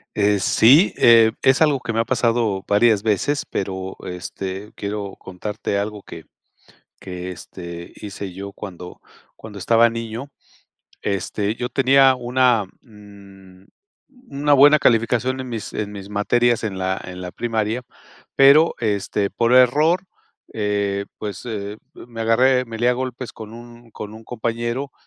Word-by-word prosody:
Eh, 105 -1 +2
sí, 135 - +5
eh, 115 -1 +6
es 135 +3 +4
algo 150 -3 +4
que 120 -2 -4
me 115 - 0
ha - - +3
pasado 115 -6 0
varias 105 0 +3
veces, 115 +7 0
pero, 95 -1 -4
este, 95 +3 -6
quiero 100 -1 -5
contarte 100 +2 -4
algo 105 +1 -3
que 80 - -11 0.7
que, 90 0 -7
este, 85 -1 -9
hice 100 -2 -7
yo 100 +2 -7
cuando 90 -3 -10 0.3
cuando 110 -2 -11
estaba 115 +5 +4
niño. 115 +3 -6 0.7
Este, 100 +2 -2
yo 125 +1 -4
tenía 135 0 +5
una, 125 -3 +2 0.2
mm, 100 -4 -16 0.7
una 145 +1 +1
buena 145 +2 +7
calificación 125 +1 +1
en 130 - -7
mis 110 -3 -5
en 105 -1 -4
mis 100 -1 -9
materias 120 +3 +1
en 95 -3 -4
la 95 0 -1
en 90 0 -8
la 90 -1 -6
primaria, 110 +1 -2 0.5
pero, 140 +4 +6
este 100 -2 -1
,por 115 +1 +1
error, 150 +8 +4 0.5
eh, 100 -2 -1
pues 105 -3 -6 0.5
me 120 -1 -11
agarré 125 +3 +3
me 115 -1 -7
lié 120 +2 +2
a - - +3
golpes 130 -1 -5
con 110 -1 -10
un 120 0 -13
con 105 0 -8
un 110 +1 -12
compañero 120 +3 -3
110 Hz, 145 wpm, -21 LUFS, 100-125 Hz, 0.7 s, buena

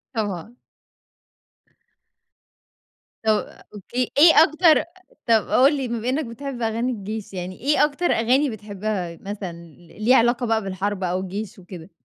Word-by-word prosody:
طبعًا. 210 +2 -4 2.7
طَب 215 -1 -1
أوكي، 240 +5 -3
إيه 320 +2 +8
أكتر 315 0 +4 0.4
طَب 225 -2 +3
قُل 275 +4 +4
لي 265 -3 -3
بما 235 +1 -3
إنّك 285 +4 0
بتحب 245 +1 -7
أغاني 230 +3 -1
الجيش 210 -1 -6
يعني، 185 0 -6
إيه 295 +3 +3
أكتر 300 +4 -1
أغاني 255 +5 +2
بتحبها 205 -5 -5
مثلًا، 200 -3 -6
ل 170 0 -16
ليها 255 +3 +6
علاقة 240 +1 +2
بقى 225 -1 +1
بالحرب 195 0 -3
أو 180 +1 -1
الجيش 195 +2 -6
وكده؟ 180 -1 -11
220 Hz, 135 wpm, -22 LUFS, 190-255 Hz, 2.7 s, إيه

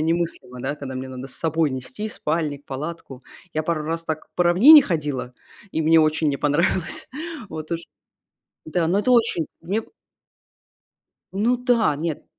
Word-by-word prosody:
немыслимо, 160 -6 -2
да, 135 +3 -2
когда 135 -2 -7
мне 130 +1 -5
надо 130 0 -7
с - - -7
собой 160 -1 +1
нести 130 +12 -5
спальник, 150 -6 -2
палатку. 140 -1 -7 0.3
Я 155 - -1
пару 155 -1 -1
раз 165 +1 -3
так 155 -1 -4
по 180 - +3
равнине 245 - +9
ходила, 145 - -3 0.4
и 160 - 0
мне 160 +1 +5
очень 155 0 +2
не 140 - 0
понравилось. 155 +4 0 0.4
Вот 155 -3 -7
уж. 165 - -1 0.9
Да, 165 +1 0
но 185 +4 +2
это 255 +5 +2
очень 230 -9 +3 0.2
мне 195 +7 -1 1.5
Ну 220 +6 +2
да, 240 - +2
нет, 155 +1 -4
160 Hz, 155 wpm, -23 LUFS, 145-175 Hz, 1.5 s, равнине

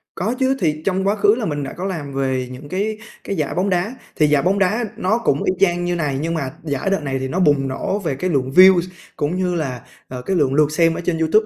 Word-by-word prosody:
Có 210 +7 -1
chứ, 265 0 +2
thì 155 -5 0
trong 190 0 0
quá 205 - +2
khứ 205 0 +4
là 235 -2 -3
mình 145 -5 -2
đã 135 - -6
có 180 - -4
làm 155 -8 -4
về 130 -2 -1
những 135 +3 -10
cái 210 +5 -2 0.3
cái 200 - -3
giải 155 -5 -2
bóng 185 +3 +1
đá. 185 +6 -1 0.2
Thì 155 - +3
giải 145 -1 +3
bóng 190 +5 +1
đá 210 +5 +1
nó 195 +5 +1
cũng 145 -12 0
y 185 - +1
chang 175 -2 +2
như 175 0 0
này, 145 -5 -1
nhưng 165 +2 -2
mà 140 -5 -2
giải 145 +3 -2
đợt 195 - +1
này 135 -2 -2
thì 130 - -3
nó 175 +8 -2
bùng 145 -6 +3
nổ 165 +9 -2
về 165 -9 -2
cái 185 +7 -2
lượng 135 -5 0
views 185 +3 +7 0.3
cũng 145 +4 -1
như 180 -1 0
là, 135 -7 -3 0.3
à, 125 - -6
cái 195 - 0
lượng 140 -6 +2
lượt 150 +1 +3
xem 165 +1 +3
ở - - -4
trên 170 -1 -1
YouTube. 165 +7 +3
170 Hz, 270 wpm, -20 LUFS, 145-190 Hz, 0.3 s, views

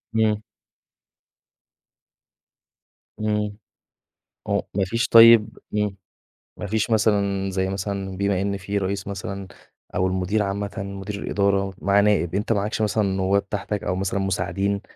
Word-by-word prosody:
إمم. 110 -1 +2 2.8
إمم. 105 -1 -1 0.9
هو - - +1
مافيش، 110 +5 0
طيب 115 -1 +7 0.2
امم، 105 -2 0 0.6
ما - - -5
فيش 110 +3 0
مثلًا، 100 -3 +2
زي 95 0 -1
مثلًا 95 -1 -4
بما 100 -1 +1
إن 100 0 -1
في 100 +1 -3
رئيس 95 0 -2
مثلًا 100 0 -5 0.5
أو 95 - +2
المدير 95 +3 0
عامةً، 100 +1 -3
مدير 100 +1 -5
الإدارة 100 -1 +1
معاه 100 +1 +4
نائب، 95 -4 +2
أنت 105 +3 +1
معكش 105 +2 -1
مثلًا 105 0 +1
نوّاب 95 +1 0
تحتك 105 0 -3
أو 90 - -1
مثلًا 95 +1 -1
مساعدين 95 +1 -1
100 Hz, 125 wpm, -23 LUFS, 95-105 Hz, 2.8 s, طيب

